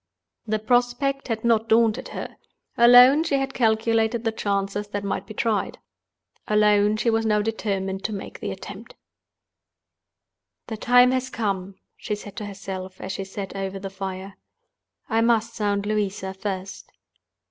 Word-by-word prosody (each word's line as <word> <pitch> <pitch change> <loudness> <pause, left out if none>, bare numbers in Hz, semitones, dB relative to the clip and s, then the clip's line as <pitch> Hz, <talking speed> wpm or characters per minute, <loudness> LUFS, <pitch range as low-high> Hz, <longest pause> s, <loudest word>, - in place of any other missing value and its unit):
The 215 0 +1
prospect 245 +4 0
had 225 -2 -3
not 225 -1 +2
daunted 225 -1 +3
her. - - -7 0.4
Alone 245 +5 +8
she 315 -4 0
had 270 0 -1
calculated 225 0 +1
the 225 - +1
chances 200 -1 -2
that 205 -1 -4
might 195 -1 -3
be 215 - -9
tried. 215 -4 -1 0.7
Alone 210 0 +3
she 230 +2 +1
was 225 0 +1
now 210 -1 +2
determined 195 -3 -2
to 220 - -1
make 200 -2 -7
the - - -4
attempt. - - -9 1.7
"The 220 - -6
time 245 +3 +5
has 255 0 -1
come," 195 -5 -3 0.2
she 210 - -3
said 205 -1 -11
to 210 - -5
herself, 190 -2 -7
as 190 - -5
she 195 0 -4
sat 195 0 -7
over 195 0 -4
the 195 0 -7
fire. 190 0 -6 0.7
"I 225 -1 +1
must 230 0 +2
sound 205 -2 -1
Louisa 205 -2 -2
first." 190 -1 -6
210 Hz, 150 wpm, -24 LUFS, 195-230 Hz, 1.7 s, Alone